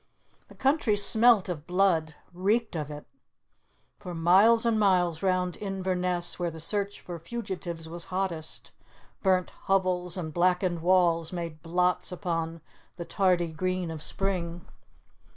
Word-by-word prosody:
The -, -, -16 dB
country 265 Hz, -6 st, +1 dB
smelt 220 Hz, 0 st, +5 dB
of 165 Hz, -4 st, -5 dB
blood; 175 Hz, -4 st, +1 dB, 0.2 s
reeked 205 Hz, +4 st, 0 dB
of 150 Hz, -2 st, -3 dB
it. 150 Hz, 0 st, -8 dB, 0.9 s
For 180 Hz, -4 st, -7 dB
miles 195 Hz, +8 st, +5 dB
and 225 Hz, -2 st, +2 dB
miles 180 Hz, -5 st, +2 dB
round 185 Hz, -2 st, 0 dB
Inverness, 185 Hz, -3 st, -1 dB
where 175 Hz, -1 st, 0 dB
the 165 Hz, 0 st, -9 dB
search 200 Hz, +4 st, -2 dB
for 175 Hz, -2 st, -7 dB
fugitives 175 Hz, -4 st, -6 dB
was 170 Hz, +1 st, -3 dB
hottest, 180 Hz, -4 st, -4 dB, 0.5 s
burnt 185 Hz, -2 st, +2 dB, 0.2 s
hovels 185 Hz, -1 st, +1 dB
and 160 Hz, -4 st, -5 dB
blackened 180 Hz, 0 st, +1 dB
walls 170 Hz, -2 st, +2 dB
made 170 Hz, -3 st, -6 dB
blots 180 Hz, +2 st, 0 dB
upon 165 Hz, -3 st, -3 dB, 0.3 s
the 170 Hz, -, -6 dB
tardy 180 Hz, -3 st, +1 dB
green 185 Hz, +1 st, -2 dB
of 160 Hz, -2 st, -7 dB
spring. 175 Hz, -2 st, -2 dB
180 Hz, 135 wpm, -28 LUFS, 170-195 Hz, 0.9 s, smelt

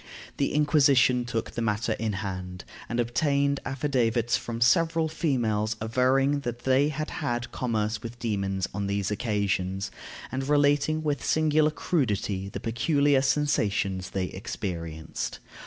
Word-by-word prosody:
The -, -, 0 dB
Inquisition 140 Hz, -5 st, +4 dB
took 115 Hz, -1 st, -3 dB
the 120 Hz, -, -4 dB
matter 110 Hz, +1 st, 0 dB
in 110 Hz, -1 st, -1 dB
hand, 90 Hz, -2 st, -5 dB, 0.2 s
and 115 Hz, -, -1 dB
obtained 140 Hz, +3 st, +1 dB
affidavits 125 Hz, -4 st, +1 dB
from 120 Hz, -1 st, -4 dB
several 165 Hz, +7 st, +3 dB
females 115 Hz, -9 st, 0 dB
averring 130 Hz, +5 st, +2 dB
that 120 Hz, -3 st, -5 dB
they 135 Hz, +3 st, +3 dB
had 155 Hz, 0 st, -4 dB
had 120 Hz, -4 st, -2 dB
commerce 110 Hz, -3 st, -1 dB
with 115 Hz, +1 st, -7 dB
demons 100 Hz, -5 st, -1 dB
on 100 Hz, +1 st, -2 dB
these 100 Hz, 0 st, -1 dB
occasions, 100 Hz, -4 st, -1 dB, 0.4 s
and 130 Hz, +1 st, -3 dB
relating 145 Hz, +2 st, +3 dB
with 145 Hz, -5 st, -1 dB
singular 155 Hz, -1 st, +3 dB
crudity 105 Hz, -, -1 dB
the -, -, -6 dB
peculiar 140 Hz, +4 st, +2 dB
sensations 105 Hz, -10 st, 0 dB
they 95 Hz, -1 st, -1 dB
experienced. 85 Hz, -5 st, -5 dB
120 Hz, 130 wpm, -27 LUFS, 105-140 Hz, 0.4 s, Inquisition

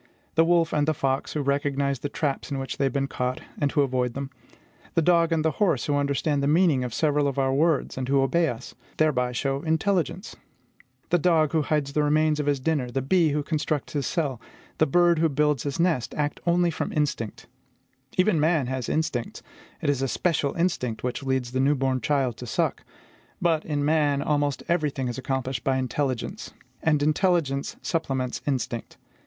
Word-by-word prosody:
The 160 Hz, -, +5 dB
wolf 170 Hz, -1 st, +2 dB
and 150 Hz, 0 st, +1 dB
the 155 Hz, -, +2 dB
fox 135 Hz, -1 st, -1 dB
who 150 Hz, -, -1 dB
recognize 140 Hz, -1 st, 0 dB
the 145 Hz, -, -4 dB
traps 140 Hz, -1 st, -2 dB
in 140 Hz, -, -2 dB
which 135 Hz, -2 st, -4 dB
they 140 Hz, -, +2 dB
have 135 Hz, -, +1 dB
been 140 Hz, -1 st, 0 dB
caught, 125 Hz, -1 st, -3 dB, 0.2 s
and 145 Hz, -2 st, +1 dB
who 145 Hz, -, +2 dB
avoid 125 Hz, -2 st, -1 dB
them; 135 Hz, 0 st, -5 dB, 0.6 s
the 165 Hz, -, +4 dB
dog 170 Hz, 0 st, +3 dB
and 160 Hz, -1 st, +1 dB
the 160 Hz, -, +3 dB
horse, 170 Hz, -, +2 dB
who 145 Hz, -, 0 dB
understand 145 Hz, +1 st, 0 dB
the 140 Hz, -, +1 dB
meaning 155 Hz, -4 st, +3 dB
of 125 Hz, -, -4 dB
several 145 Hz, +2 st, +1 dB
of 140 Hz, -, -3 dB
our 135 Hz, -1 st, +2 dB
words, 150 Hz, -2 st, +1 dB
and 130 Hz, -, -3 dB
who 135 Hz, -1 st, +4 dB
obey 170 Hz, +5 st, +2 dB
us, 115 Hz, -, -7 dB, 0.2 s
thereby 130 Hz, -6 st, +2 dB
show 135 Hz, +2 st, -1 dB
intelligence. 170 Hz, +3 st, -1 dB, 0.8 s
The 175 Hz, -, +4 dB
dog 160 Hz, -3 st, +3 dB
who 160 Hz, -, +2 dB
hides 145 Hz, -2 st, -1 dB
the 150 Hz, -, +2 dB
remains 155 Hz, +1 st, +2 dB
of 145 Hz, -, -2 dB
his 145 Hz, -2 st, +2 dB
dinner, 135 Hz, -2 st, 0 dB
the 135 Hz, +1 st, -2 dB
bee 165 Hz, +3 st, +3 dB
who 150 Hz, 0 st, -1 dB
constructs 155 Hz, -1 st, -2 dB
his 145 Hz, -3 st, -1 dB
cell, 140 Hz, -9 st, -2 dB, 0.4 s
the -, -, +4 dB
bird 175 Hz, +2 st, +4 dB
who 165 Hz, 0 st, +3 dB
builds 150 Hz, -2 st, +1 dB
his 145 Hz, +2 st, -4 dB
nest, 165 Hz, -8 st, +1 dB
act 150 Hz, 0 st, -1 dB
only 175 Hz, 0 st, +3 dB
from -, -, -3 dB
instinct. 140 Hz, -7 st, -2 dB, 0.7 s
Even 185 Hz, -3 st, +3 dB
man 155 Hz, -2 st, +2 dB
has 130 Hz, -1 st, -3 dB
instincts: 145 Hz, -7 st, -2 dB, 0.4 s
it -, -, +1 dB
is 135 Hz, -2 st, -2 dB
a 135 Hz, -, +1 dB
special 150 Hz, -1 st, 0 dB
instinct 165 Hz, -10 st, -1 dB
which 125 Hz, +2 st, -2 dB
leads 130 Hz, -2 st, -1 dB
the 130 Hz, -, -1 dB
new 140 Hz, +3 st, +3 dB
born 130 Hz, -1 st, 0 dB
child 135 Hz, -5 st, 0 dB
to 125 Hz, -, -8 dB
suck. -, -, -1 dB, 0.6 s
But, 165 Hz, -3 st, +1 dB
in 145 Hz, -2 st, -1 dB
man, 145 Hz, -2 st, +2 dB
almost 145 Hz, -2 st, 0 dB
every 165 Hz, -3 st, +1 dB
thing 135 Hz, -2 st, -3 dB
is 120 Hz, -, -5 dB
accomplished 130 Hz, -2 st, -2 dB
by 135 Hz, -1 st, +1 dB
intelligence; 130 Hz, -1 st, -3 dB, 0.3 s
and 150 Hz, -2 st, +2 dB
intelligence 155 Hz, -3 st, +1 dB
supplements 135 Hz, -6 st, -2 dB
instinct. 120 Hz, -4 st, -3 dB
145 Hz, 195 wpm, -25 LUFS, 135-160 Hz, 0.8 s, The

